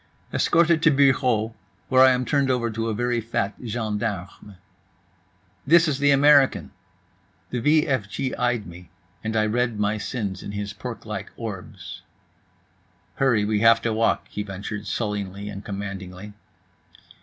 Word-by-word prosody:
Escorted 170 Hz, -1 st, +3 dB
to 165 Hz, -, +5 dB
bureau, 130 Hz, -6 st, +2 dB, 0.3 s
where 130 Hz, -1 st, +4 dB
I 130 Hz, -, +8 dB
am 125 Hz, 0 st, +1 dB
turned 140 Hz, -1 st, +1 dB
over 120 Hz, -3 st, 0 dB
to 115 Hz, +1 st, -2 dB
a -, -, -1 dB
very 120 Hz, +1 st, 0 dB
fat 115 Hz, -2 st, -2 dB
gendarme. 105 Hz, -4 st, -4 dB, 1.1 s
"This 165 Hz, +2 st, +6 dB
is 145 Hz, -3 st, -1 dB
the 145 Hz, 0 st, +3 dB
American." 140 Hz, -1 st, +4 dB, 0.8 s
The 125 Hz, -, -1 dB
v 150 Hz, +5 st, +3 dB
f 125 Hz, -8 st, -1 dB
g 130 Hz, +7 st, -3 dB
eyed 120 Hz, -3 st, -1 dB
me, 85 Hz, 0 st, -12 dB, 0.3 s
and 110 Hz, 0 st, -3 dB
I 110 Hz, -1 st, +3 dB
read 115 Hz, 0 st, 0 dB
my 105 Hz, +1 st, 0 dB
sins 100 Hz, -3 st, -4 dB
in 100 Hz, -, -7 dB
his 100 Hz, 0 st, -4 dB
porklike -, -, -6 dB
orbs. -, -, -8 dB, 1.2 s
"Hurry, 120 Hz, -6 st, +2 dB
we 105 Hz, 0 st, +1 dB
have 115 Hz, +1 st, +6 dB
to 115 Hz, -, 0 dB
walk," 115 Hz, +1 st, +1 dB
he 105 Hz, -, -5 dB
ventured 100 Hz, +1 st, -6 dB
sullenly 100 Hz, -2 st, -3 dB
and 100 Hz, 0 st, -8 dB
commandingly. 100 Hz, -1 st, -7 dB
115 Hz, 145 wpm, -24 LUFS, 105-130 Hz, 1.2 s, I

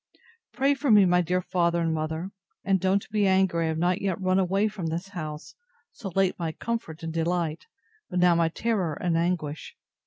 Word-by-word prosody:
Pray 270 Hz, +4 st, +2 dB
for 280 Hz, 0 st, -2 dB
me, 210 Hz, -3 st, +7 dB
my 180 Hz, 0 st, +4 dB
dear 180 Hz, +2 st, 0 dB
father 170 Hz, -1 st, +1 dB
and 165 Hz, -1 st, 0 dB
mother: 160 Hz, +4 st, -3 dB, 0.3 s
and 195 Hz, -1 st, +2 dB
don't 190 Hz, +2 st, +1 dB
be 205 Hz, -2 st, +2 dB
angry 190 Hz, -3 st, +2 dB
I -, -, 0 dB
have 160 Hz, 0 st, -1 dB
not 175 Hz, +3 st, +1 dB
yet 195 Hz, -2 st, -1 dB
run 185 Hz, 0 st, +2 dB
away 195 Hz, +3 st, +2 dB
from 200 Hz, -6 st, -5 dB
this 170 Hz, +4 st, -4 dB
house, 155 Hz, -5 st, -7 dB, 0.4 s
so 200 Hz, -, -7 dB
late 195 Hz, -2 st, +1 dB
my 165 Hz, -2 st, -2 dB
comfort 225 Hz, -9 st, -5 dB
and 165 Hz, 0 st, -4 dB
delight, 165 Hz, -1 st, -1 dB, 0.4 s
but 180 Hz, -, -3 dB
now 180 Hz, -1 st, +5 dB
my 165 Hz, -1 st, +2 dB
terror 195 Hz, -3 st, -1 dB
and 175 Hz, 0 st, -1 dB
anguish. 165 Hz, -3 st, -2 dB
180 Hz, 195 wpm, -26 LUFS, 165-195 Hz, 0.4 s, me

